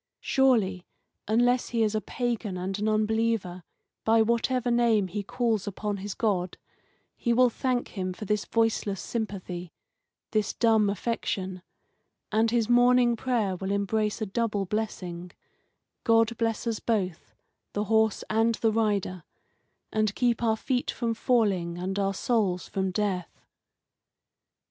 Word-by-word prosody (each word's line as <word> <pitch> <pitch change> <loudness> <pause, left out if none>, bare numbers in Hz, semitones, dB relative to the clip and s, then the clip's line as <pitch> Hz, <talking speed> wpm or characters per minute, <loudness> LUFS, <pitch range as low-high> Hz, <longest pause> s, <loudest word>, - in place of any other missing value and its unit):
Surely, 220 -9 +2 0.4
unless 245 +3 +2
he 230 -2 +1
is 215 -1 +1
a 215 - 0
pagan 235 -6 -3
and 190 +2 -3
an 215 +1 +1
unbeliever, 215 -4 0 0.4
by 225 +1 +4
whatever 235 +2 +1
name 230 -4 +3
he 205 +4 -3
calls 220 -1 -1
upon 205 +1 -3
his 200 +1 -5
God, 185 -5 -1 0.6
he 235 - -1
will 250 0 +4
thank 250 +1 -1
Him 185 -3 -3
for 195 +4 -7
this 210 +1 0
voiceless 225 -3 0
sympathy, 185 -6 -4 0.6
this 215 -2 0
dumb 220 -3 +3
affection, 190 -3 -3 0.7
and 220 +1 +3
his 230 -1 +1
morning 245 0 +5
prayer 225 -6 0
will 190 +1 -5
embrace 210 +1 0
a - - 0
double 210 -1 -1
blessing 180 -4 -4 0.7
God 225 0 +3
bless 225 0 -1
us 230 -2 -1
both, 190 -7 -2 0.4
the 205 - 0
horse 220 0 +2
and 225 +1 +2
the 225 0 +1
rider, 205 -5 0 0.7
and 215 -2 +1
keep 240 -2 +1
our 220 -2 +2
feet 250 +2 -1
from 235 -2 -1
falling 200 -8 +1
and 190 +3 -3
our 195 0 0
souls 195 -6 0
from 190 -1 -1
death! 185 -3 -2
215 Hz, 140 wpm, -27 LUFS, 195-230 Hz, 0.7 s, morning